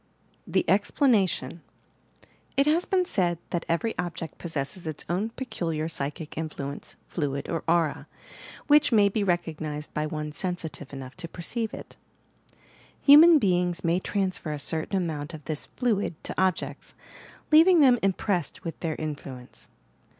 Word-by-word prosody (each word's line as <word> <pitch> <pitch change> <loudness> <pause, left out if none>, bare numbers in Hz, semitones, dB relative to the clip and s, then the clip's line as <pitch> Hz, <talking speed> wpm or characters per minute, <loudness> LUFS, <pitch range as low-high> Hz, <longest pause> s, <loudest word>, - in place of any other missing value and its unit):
THE - - +1
EXPLANATION 190 - +2 1.0
It 275 - +5
has 320 +4 +3
been 370 -1 +2
said 175 - +1
that 175 - -2
every 170 +7 0
object 170 -3 -5
possesses 160 +1 -4
its 155 -2 -5
own 190 +6 -1
peculiar 165 - -3
psychic 150 0 -5
influence, 145 -3 -5
fluid 140 -4 -3
or 165 - -2
aura, 165 -3 +1 0.6
which 295 -1 +5
may 205 -3 +5
be 205 +1 -1
recognized 155 -5 -2
by 150 0 -1
one 150 0 -4
sensitive 160 -3 -4
enough 135 -2 -8
to 175 -2 -6
perceive 215 +7 -3
it. - - -10 1.1
Hu 285 - +10
man 335 0 +8
beings 180 - +1
may 170 +1 +2
transfer 185 -5 -2
a 150 - -3
certain 160 +6 -1
amount 160 -3 -3
of 155 - -12
this 155 -2 -3
"fluid" 215 -8 -1
to - - -4
objects, 190 -2 -1 0.6
leaving 330 +2 +7
them 250 -4 +6
impressed 190 -4 -1
with 165 -2 -6
their 160 -3 -2
influence. 140 -5 -7
170 Hz, 145 wpm, -27 LUFS, 155-205 Hz, 1.1 s, Hu